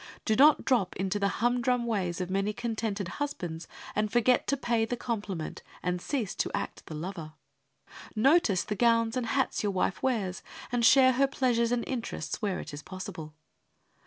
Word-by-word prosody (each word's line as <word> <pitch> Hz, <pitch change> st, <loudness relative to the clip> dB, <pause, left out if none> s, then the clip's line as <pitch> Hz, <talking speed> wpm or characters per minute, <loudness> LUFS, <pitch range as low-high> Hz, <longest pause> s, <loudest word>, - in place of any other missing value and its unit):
Do 220 Hz, -, +2 dB
not 295 Hz, +5 st, +6 dB
drop 240 Hz, -8 st, +2 dB
into 190 Hz, +2 st, -1 dB
the 200 Hz, -, +2 dB
humdrum 245 Hz, +2 st, +1 dB
ways 190 Hz, -7 st, -1 dB
of 180 Hz, 0 st, -3 dB
many 195 Hz, +2 st, 0 dB
contented 220 Hz, -4 st, -3 dB
husbands, 180 Hz, -, -4 dB, 0.3 s
and 210 Hz, 0 st, 0 dB
forget 240 Hz, +1 st, +3 dB
to 280 Hz, -, +1 dB
pay 235 Hz, -3 st, +1 dB
the 245 Hz, +2 st, -2 dB
compliment, 205 Hz, -9 st, -4 dB, 0.2 s
and 180 Hz, 0 st, -1 dB
cease 240 Hz, -7 st, -2 dB
to -, -, 0 dB
act -, -, -5 dB
the 155 Hz, -, -6 dB
lover. 165 Hz, -1 st, -6 dB, 0.8 s
Notice 235 Hz, -, +4 dB
the -, -, -3 dB
gowns 230 Hz, +1 st, +3 dB
and 250 Hz, -2 st, -1 dB
hats 265 Hz, +3 st, 0 dB
your 205 Hz, -, 0 dB
wife 190 Hz, 0 st, -1 dB
wears, 205 Hz, -8 st, -1 dB, 0.3 s
and 245 Hz, -1 st, 0 dB
share 260 Hz, +2 st, +7 dB
her 270 Hz, +2 st, +3 dB
pleasures 245 Hz, -3 st, +1 dB
and 245 Hz, -1 st, +1 dB
interests 245 Hz, -2 st, -4 dB
when 200 Hz, -4 st, -1 dB
it -, -, -7 dB
is 145 Hz, -, -6 dB
possible. 165 Hz, -4 st, -8 dB
225 Hz, 175 wpm, -29 LUFS, 190-245 Hz, 0.8 s, share